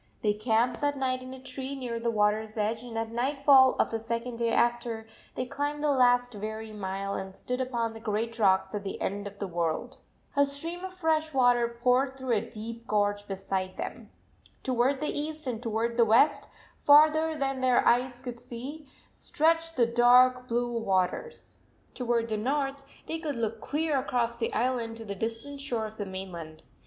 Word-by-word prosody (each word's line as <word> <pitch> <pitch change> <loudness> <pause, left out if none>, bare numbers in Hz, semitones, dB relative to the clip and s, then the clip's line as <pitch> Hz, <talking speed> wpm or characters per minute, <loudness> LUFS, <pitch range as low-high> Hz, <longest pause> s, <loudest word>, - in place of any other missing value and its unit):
They 210 -1 +3
camped 230 +3 +1
that 290 -1 0
night 255 -1 -1
in 255 0 -9
a 260 - -8
tree, 265 +1 -6
near 245 -3 -4
the 235 0 0
water 210 -1 +2
s 220 0 -9
edge, 220 +2 0
and, 240 -2 -7
at 225 0 -2
night 260 +5 -1
fall 270 -2 +7
of - - +1
the 225 - -1
second 230 +1 -3
day 235 -1 +1
after, 235 -1 0 0.3
they 255 - -2
climbed 290 +3 -3
the 300 - +3
last 245 -2 +3
weary 220 +1 -6
mile 195 -1 -3
and 190 0 -5
stood 250 +1 -3
upon 235 -3 -1
the 225 - -9
great 225 +1 -2
rocks 190 -1 +3
at 205 -1 -3
the 195 - -5
end 200 +1 -3
of 200 0 -10
the 200 - -3
world. 170 -3 -2 0.4
A 285 - +5
stream 325 +6 -3
of 375 - -5
fresh 315 -4 0
water 245 -2 +4 0.2
poured 260 +2 +3
through 260 -2 -3
a 205 - +1
deep 230 +1 -8
gorge 205 -1 0
beside 190 -1 -3
them. - - -6 0.5
Toward 260 +2 +1
the 300 - -1
east 310 0 -5
and 240 -3 -3
toward 230 0 -1
the 235 - +6
west, 225 +7 +4 0.3
farther 310 +2 +5
than 270 -2 -2
their 255 -1 +3
eyes 245 +1 +2
could 245 -2 -6
see, 265 +5 -8 0.2
stretched 330 +1 +1
the 240 - +5
dark 250 +2 +5
blue 240 0 -1
waters. 195 - -2 0.3
Toward 235 -2 0
the 215 - -1
north 275 +4 -1 0.2
they 325 - -4
could 305 -4 -3
look 225 -1 -3
clear 300 -1 0
across 240 -3 0
the 230 -1 -2
island 235 -2 -1
to 225 - -8
the 200 - -4
distant 230 +7 -5
shore 240 -6 -2
of 215 0 -9
the 205 - -4
mainland. 175 -5 -7
240 Hz, 190 wpm, -28 LUFS, 220-270 Hz, 0.5 s, fall